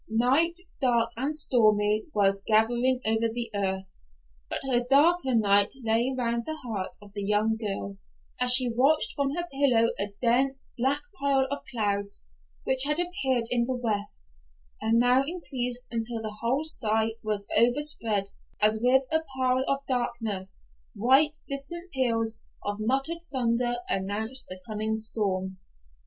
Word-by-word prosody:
Night, 265 +10 +3 0.3
dark 235 -3 +2
and 275 +6 -2
stormy, 215 -6 +2
was 195 -3 +1
gathering 240 +4 +2
over 220 +1 +2
the 235 0 -4
earth, 190 -1 -1 0.6
but - - -3
a 245 -2 +2
darker 285 -1 +4
night 205 0 +3
lay 230 +3 +2
round 235 -1 -1
the 315 - -3
heart 225 -10 -5
of 200 -1 -16
the 205 - -4
young 210 +2 +1
girl, 200 -2 -4 0.4
as 250 0 +6
she 250 -1 +6
watched 275 +6 +2
from 280 0 -1
her 345 0 -1
pillow 255 -5 +3
a 200 - +1
dense, 265 +3 +1
black 270 +4 0 0.2
pile 275 -1 +2
of 285 - -2
clouds, 200 - -1 0.4
which 265 0 +1
had 300 +3 0
appeared 275 -9 0
in 240 -1 +2
the 260 +1 -2
west, 210 - -3 0.5
and 220 +1 +2
now 250 +2 +4
increased 255 -6 -3
until 230 0 -2
the 215 -1 -6
whole 255 +6 0
sky 220 -7 +1
was 210 -2 -2
overspread, 235 -4 +3 0.4
as 215 +1 +2
with 260 +2 +4
a 320 - +3 0.2
pall 255 0 +1
of 275 0 -1
darkness, 230 -6 -3 0.3
while 265 +8 +4 0.2
distant 340 +6 -5
peals 225 -4 0 0.2
of 205 0 -2
muttered 270 +9 -1
thunder 240 -2 0
announced 210 +6 -1
the 185 0 -7
coming 215 0 -2
storm. 190 -4 -2
235 Hz, 145 wpm, -27 LUFS, 215-265 Hz, 0.6 s, as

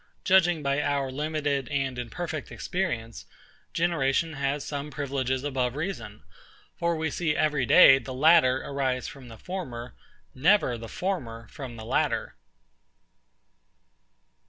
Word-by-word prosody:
Judging 175 -4 +4
by 140 +1 +1
our 140 -2 -1
limited 145 -2 -2
and 135 -3 -1
imperfect 155 +6 -5
experience, 120 - -3 0.4
generation 165 -2 +1
has 140 0 -2
some 145 0 -4
privileges 135 -2 -2
above 130 -3 -1
reason: 130 - -5 0.5
for 170 0 0
we 160 -1 -2
see 155 -2 0
every 150 -5 +1
day 135 -5 +8
the 130 +1 -8
latter 135 -1 +4
arise 130 -3 -2
from 135 -3 -10
the 115 -1 -11
former, 125 - -6 0.4
never 160 -2 +3
the 115 -1 -8
former 120 - -4
from 130 -4 -8
the 110 -1 -9
latter. - - 0
140 Hz, 125 wpm, -27 LUFS, 130-160 Hz, 0.5 s, day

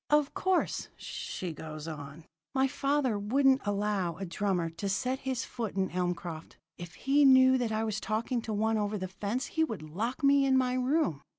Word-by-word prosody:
"'Of 295 -1 +3
course,' 375 -1 0
she 180 -3 -5
goes 155 0 -8
on, 150 0 -8 0.3
'my 265 0 +3
father 275 -4 0
wouldn't 265 +6 +3
allow 200 -4 -1
a 195 - -4
drummer 180 -2 -1
to 180 +5 -4
set 255 +7 -1
his 260 -2 -2
foot 230 -5 -5
in 190 -1 0
Elmcroft. 175 -2 -3 0.2
If 175 0 -8
he 280 +2 +3
knew 260 -1 +7
that 235 -3 -1
I 220 0 0
was 215 -3 -2
talking 230 +3 -1
to 225 - -5
one 220 +1 +1
over 210 0 -1
the 185 -1 -4
fence 205 +7 -3
he 320 - 0
would 220 - -3
lock 225 - -4
me 280 0 +5
in 265 -1 +4
my 255 -1 +2
room.' 255 - +1
215 Hz, 190 wpm, -30 LUFS, 185-265 Hz, 0.3 s, knew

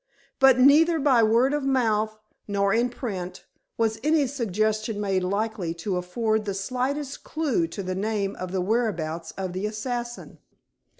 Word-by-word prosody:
But 265 -2 +6
neither 305 +6 +6
by 270 -5 +4
word 230 +5 +3
of 295 - 0
mouth, 220 -5 +1 0.3
nor 200 -1 +1
in 240 +2 +2
print, 190 -8 -6 0.3
was 220 -1 0
any 305 -1 +3
suggestion 215 -4 -1
made 195 -3 0
likely 200 -3 -2
to 185 +3 -3
afford 215 +4 -1
the 200 -2 -2
slightest 260 +7 -3
clue 285 - 0
to 195 +4 -6
the 185 0 -3
name 200 0 -1
or 185 - -2
the 185 +1 -2
whereabouts 180 -6 -1
of 190 -2 -3
the 190 +3 -2
assassin. 240 +2 -5
215 Hz, 155 wpm, -25 LUFS, 195-250 Hz, 0.3 s, But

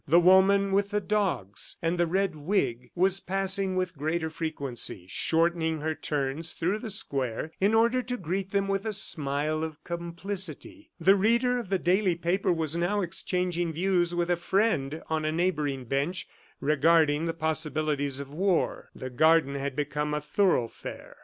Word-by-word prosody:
The 165 +5 +6
woman 190 +2 +5
with 200 +1 +2
the 210 0 0
dogs 195 - -1
and 165 +1 0
the 175 - +3
red 190 0 0
wig 140 - -1
was 190 +2 +3
passing 195 0 0
with 185 -1 -1
greater 160 +3 -2
frequency, 140 - -2
shortening 160 - 0
her 160 +1 -1
turns 150 +1 -3
through 185 +6 -1
the 225 - -6
square 140 - -2
in 205 +3 +3
order 235 +3 +3
to 250 +1 -4
greet 190 +1 -3
them 200 0 0
with 195 0 -1
a 215 - -1
smile 155 -4 +1
of 160 -2 -6
complicity. 185 - -5
The 190 +4 +5
reader 235 +5 +2
of 225 -6 -7
the 195 - +2
daily 185 +1 +2
paper 175 +3 0
was 160 -2 0
now 185 +5 0
exchanging 175 -1 -2
views 175 0 +1
with 175 0 0
a - - +4
friend 170 -5 0
on 160 -1 -1
a 155 - 0
neighboring 150 -6 -1
bench 140 +9 -2 0.3
regarding 155 +1 +3
the 165 - -2
possibilities 155 -3 -1
of 140 0 -8
war. 185 +2 0
The 130 - -7
garden 155 +1 +4
had 140 -1 -3
become 150 +1 -2
a - - 0
thoroughfare. 150 - -1
170 Hz, 165 wpm, -28 LUFS, 150-195 Hz, 0.3 s, The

